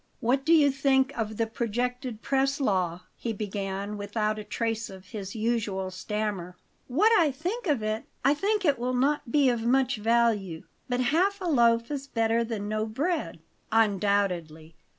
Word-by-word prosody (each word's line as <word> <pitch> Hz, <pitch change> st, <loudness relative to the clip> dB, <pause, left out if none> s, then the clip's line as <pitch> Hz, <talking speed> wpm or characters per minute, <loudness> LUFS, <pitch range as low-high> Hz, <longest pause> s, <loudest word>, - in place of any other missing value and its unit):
"What 265 Hz, +3 st, +1 dB
do 320 Hz, -, +1 dB
you 300 Hz, -4 st, +6 dB
think 270 Hz, 0 st, +2 dB
of 220 Hz, -2 st, -3 dB
the 230 Hz, -, +1 dB
projected 240 Hz, +1 st, -3 dB
press 275 Hz, +1 st, +1 dB
law?" 185 Hz, -8 st, 0 dB
he 230 Hz, -, -4 dB
began, 200 Hz, 0 st, -4 dB
without 215 Hz, +1 st, -1 dB
a -, -, -6 dB
trace 225 Hz, +2 st, -2 dB
of 190 Hz, -1 st, -12 dB
his 200 Hz, -1 st, -6 dB
usual 215 Hz, -4 st, -1 dB
stammer. 185 Hz, -2 st, -4 dB, 0.3 s
"What 360 Hz, -, +3 dB
I 320 Hz, -3 st, +4 dB
think 360 Hz, -, -4 dB
of 280 Hz, -8 st, +1 dB
it? 215 Hz, +1 st, -2 dB, 0.2 s
I 275 Hz, -, +6 dB
think 405 Hz, +5 st, 0 dB
it 285 Hz, -6 st, +3 dB
will 250 Hz, +1 st, -1 dB
not 275 Hz, 0 st, +1 dB
be 285 Hz, 0 st, +4 dB
of 240 Hz, -2 st, 0 dB
much 260 Hz, +1 st, +2 dB
value, 215 Hz, -6 st, +1 dB, 0.3 s
but 250 Hz, 0 st, 0 dB
half 395 Hz, +5 st, +2 dB
a 375 Hz, -, -5 dB
loaf 235 Hz, -5 st, +3 dB
is 275 Hz, -1 st, -4 dB
better 230 Hz, -1 st, +1 dB
than 220 Hz, -3 st, -4 dB
no 215 Hz, +1 st, -1 dB
bread." 265 Hz, -, -2 dB, 0.3 s
"Undoubtedly. 195 Hz, -7 st, +1 dB
230 Hz, 170 wpm, -27 LUFS, 205-270 Hz, 0.3 s, you